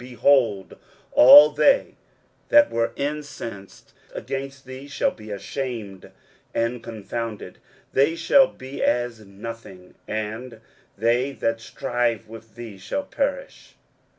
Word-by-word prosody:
23:041:011 125 Hz, -, -10 dB
Behold, 115 Hz, -7 st, +2 dB, 0.3 s
all 145 Hz, +4 st, +9 dB
they 275 Hz, -, +2 dB, 0.5 s
that 295 Hz, 0 st, +6 dB
were 115 Hz, 0 st, 0 dB
incensed 140 Hz, -9 st, -6 dB, 0.2 s
against 135 Hz, 0 st, -6 dB
thee 130 Hz, +2 st, -9 dB
shall 145 Hz, -, 0 dB
be 110 Hz, -1 st, -13 dB
ashamed 105 Hz, -2 st, -6 dB, 0.5 s
and 115 Hz, +1 st, -1 dB
confounded: 115 Hz, 0 st, -6 dB, 0.3 s
they 140 Hz, +5 st, +3 dB
shall 265 Hz, +11 st, +5 dB
be 130 Hz, -, -9 dB
as 120 Hz, -2 st, 0 dB
nothing; 100 Hz, -2 st, -10 dB
and 110 Hz, +2 st, -5 dB, 0.4 s
they 120 Hz, +5 st, +1 dB
that 115 Hz, -3 st, -2 dB
strive 120 Hz, -3 st, -2 dB
with 115 Hz, -1 st, -13 dB
thee 115 Hz, -5 st, -9 dB
shall 285 Hz, -, -3 dB
perish. 275 Hz, -1 st, -4 dB
120 Hz, 115 wpm, -23 LUFS, 110-140 Hz, 0.5 s, all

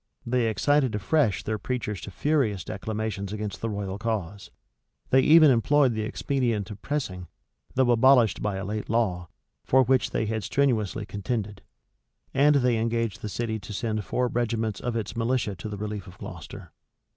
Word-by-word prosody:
They 120 Hz, -1 st, +1 dB
excited 130 Hz, +3 st, +2 dB
afresh 115 Hz, +1 st, +1 dB
their 110 Hz, 0 st, -2 dB
preachers 105 Hz, -3 st, -3 dB
to -, -, -7 dB
furious 110 Hz, -, 0 dB
declamations 105 Hz, -1 st, -4 dB
against 105 Hz, -2 st, -5 dB
the 115 Hz, -, -1 dB
royal 100 Hz, -1 st, -4 dB
cause. 105 Hz, -4 st, -3 dB, 0.6 s
They 130 Hz, -, +6 dB
even 155 Hz, 0 st, +7 dB
employed 130 Hz, +2 st, +3 dB
the 110 Hz, -, -2 dB
expedient 115 Hz, -2 st, -1 dB
of 100 Hz, -1 st, -9 dB
pressing, 95 Hz, -, -3 dB, 0.5 s
though 130 Hz, -2 st, +3 dB
abolished 120 Hz, -3 st, +5 dB
by 105 Hz, -2 st, -1 dB
a 95 Hz, 0 st, -4 dB
late 105 Hz, +2 st, -4 dB
law, 95 Hz, -7 st, 0 dB, 0.4 s
for 130 Hz, 0 st, +4 dB
which 130 Hz, +1 st, +2 dB
they -, -, -1 dB
had 110 Hz, 0 st, -2 dB
strenuously 110 Hz, -5 st, 0 dB
contended.[*] 105 Hz, -1 st, -4 dB, 0.7 s
And 145 Hz, +2 st, +5 dB
they 125 Hz, -4 st, +2 dB
engaged 115 Hz, -1 st, -1 dB
the 105 Hz, -, -4 dB
city 110 Hz, +1 st, -2 dB
to 100 Hz, +2 st, -9 dB
send 110 Hz, 0 st, -2 dB
four 125 Hz, +4 st, 0 dB
regiments 115 Hz, -3 st, -1 dB
of 120 Hz, -1 st, -3 dB
its 110 Hz, -1 st, -3 dB
militia 115 Hz, -3 st, 0 dB
to 100 Hz, +5 st, -6 dB
the 105 Hz, -, -5 dB
relief 105 Hz, -1 st, -5 dB
of 90 Hz, -, -13 dB
Gloucester. -, -, -9 dB
110 Hz, 170 wpm, -26 LUFS, 105-125 Hz, 0.7 s, even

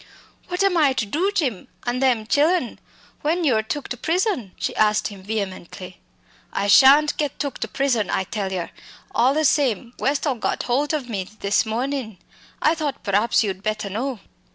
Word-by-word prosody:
"What 360 Hz, +2 st, -1 dB
am 390 Hz, -3 st, +3 dB
I 290 Hz, -4 st, +4 dB
to 230 Hz, -4 st, -1 dB
do, 335 Hz, -, 0 dB
Jim, 265 Hz, -, -1 dB, 0.2 s
an' 245 Hz, +1 st, -1 dB
them 250 Hz, -5 st, +2 dB
chillen 295 Hz, +2 st, +1 dB, 0.4 s
when 335 Hz, +4 st, 0 dB
you're 240 Hz, -8 st, +3 dB
took 275 Hz, +6 st, -4 dB
to 250 Hz, -, -4 dB
prison?" 330 Hz, -, -1 dB
she -, -, -3 dB
asked 215 Hz, 0 st, +2 dB
him 200 Hz, -2 st, -11 dB
vehemently. 185 Hz, -3 st, -5 dB, 0.5 s
"I 200 Hz, -, -1 dB
shan't 280 Hz, +6 st, +7 dB
get 295 Hz, -3 st, -2 dB
took 285 Hz, -2 st, -4 dB
to -, -, -2 dB
prison, 245 Hz, -8 st, 0 dB
I 190 Hz, -, 0 dB
tell 195 Hz, 0 st, -4 dB
yer. 180 Hz, -3 st, -3 dB, 0.4 s
All 260 Hz, +4 st, +3 dB
the 310 Hz, 0 st, +2 dB
same, 250 Hz, -5 st, +1 dB
Westall 275 Hz, -2 st, 0 dB
got -, -, -1 dB
holt 275 Hz, +4 st, 0 dB
o' 300 Hz, -, -1 dB
me 215 Hz, -7 st, -4 dB, 0.2 s
this 200 Hz, +3 st, +2 dB
mornin'. 240 Hz, -2 st, -3 dB, 0.5 s
I 310 Hz, -, +5 dB
thought 305 Hz, -4 st, -4 dB
praps 210 Hz, +4 st, +2 dB
you'd 190 Hz, -3 st, -3 dB
better 210 Hz, -1 st, -3 dB
know." 245 Hz, +3 st, -3 dB
250 Hz, 175 wpm, -22 LUFS, 210-290 Hz, 0.5 s, shan't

